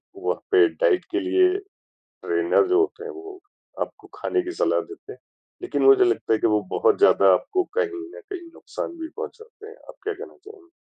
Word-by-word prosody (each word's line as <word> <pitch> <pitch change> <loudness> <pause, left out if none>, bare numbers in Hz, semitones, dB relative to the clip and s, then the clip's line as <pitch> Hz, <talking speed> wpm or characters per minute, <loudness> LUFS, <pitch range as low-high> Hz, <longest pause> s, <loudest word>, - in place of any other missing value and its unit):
वहाँ - - -2
पे 390 -2 +6 0.2
डाइट 425 -7 +3
के 360 - 0
लिए 365 0 +3 0.5
ट्रेनर 400 -1 0
जो 370 +1 +3
होते 420 +2 -2
हैं, 455 - -6
वो 390 -1 -10 0.4
आपको - - -6
खाने 375 - -1
की 355 - -5
सलाह - - +2
देते 400 +1 -12
हैं। - - -18 0.4
लेकिन 370 - -2
मुझे 405 -1 +7
लगता 370 - +1
है 110 - +1
कि - - +2
वो 105 -1 +2
बहुत - - +2
ज़्यादा 95 -1 +6
आपको 370 - 0
कहीं 410 -7 -1
न 485 - -10
कहीं 350 -4 -7
नुक़सान 340 - -7
भी 320 - -5
पहुँचाते 455 -1 -9
हैं। 450 - -12
आप - - -15
क्या 430 - -2
कहना 420 +3 -11
चाहेंगे? 410 -4 -14
390 Hz, 200 wpm, -23 LUFS, 365-425 Hz, 0.5 s, मुझे